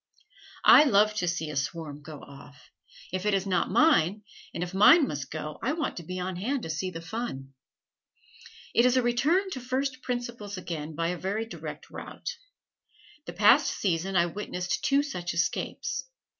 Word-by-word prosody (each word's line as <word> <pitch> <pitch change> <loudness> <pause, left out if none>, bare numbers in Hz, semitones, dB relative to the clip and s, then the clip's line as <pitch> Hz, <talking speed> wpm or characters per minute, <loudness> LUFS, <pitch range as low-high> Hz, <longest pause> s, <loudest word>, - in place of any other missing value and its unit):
I 300 - +9
love 215 -4 +4
to 180 - 0
see 165 -3 -2
a - - -7
swarm 145 +1 -4
go 150 0 -10
off 140 -1 -15 0.4
if 185 0 -2
it 210 - +3
is 195 0 -1
not 190 -2 0
mine, 210 - +3 0.3
and 170 - -3
if 180 +1 -6
mine 275 - +7
must 140 -3 -5
go 155 -1 -6
I 265 +6 0
want 315 -3 -2
to 170 - -6
be 185 +3 -5
on 180 0 -3
hand 250 +7 -2
to 160 - -4
see 170 +4 -2
the 165 -2 -8
fun. 160 - -5 1.2
It 235 - +5
is 250 +1 +4
a 255 - +3
return 305 +11 +2
to 260 - -4
first 260 +1 -2
principles 240 -5 -4
again 160 -4 -5
by 165 +1 0
a 180 -1 -3
very 205 +4 -2
direct 225 - -8
route. - - -7 0.9
The - - -6
past - - +5
season 190 0 -1
I 170 -1 +5
witnessed 180 0 -3
two 275 +1 +3
such 180 -12 -4
escapes. 465 - -2
190 Hz, 180 wpm, -28 LUFS, 165-245 Hz, 1.2 s, I